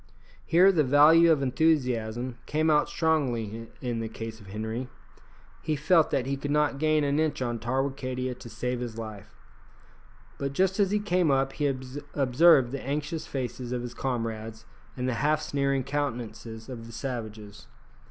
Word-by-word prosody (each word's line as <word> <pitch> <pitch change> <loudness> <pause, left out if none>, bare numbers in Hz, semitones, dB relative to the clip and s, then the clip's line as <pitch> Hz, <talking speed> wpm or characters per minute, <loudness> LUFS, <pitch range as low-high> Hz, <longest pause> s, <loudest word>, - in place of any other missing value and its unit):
Here 185 +4 +5
the 160 -5 +3
value 155 +5 +6
of 145 -3 +2
enthusiasm 125 -5 0
came 155 +1 +2
out 150 -1 +3
strongly 120 -9 -1 0.2
in 120 -2 -2
the 115 -1 -3
case 115 0 -7
of 100 - -15
Henri. 110 +5 -4 0.7
He 155 -1 -1
felt 160 +2 +3
that 125 - 0
he 135 +1 -2
could 145 +1 -5
not 145 -1 +1
gain 155 0 +2
an 140 +1 +1
inch 155 -2 0
on 120 -2 -2
Tarwicadia 130 +1 -2
to 120 -1 -11
save 125 +2 -3
his 120 -2 -5
life, 110 -3 -8 1.0
but 140 0 -2
just 190 +5 +1
as 200 -2 +4
he 210 - +2
came 180 -5 +1
up 135 0 +2
he 145 - 0 0.5
observed 135 -1 +5
the 140 -1 -4
anxious 150 +4 -3
faces 125 -2 -4
of 125 -1 -2
his 120 -1 -6
comrades 115 -3 -4 0.3
and 125 0 -2
the 130 - 0
half 150 +1 +2
sneering 140 -3 0
countenances 120 -5 -4
of 115 -3 -8
the - - -10
savages. 110 -5 -6
130 Hz, 165 wpm, -27 LUFS, 115-150 Hz, 1.0 s, value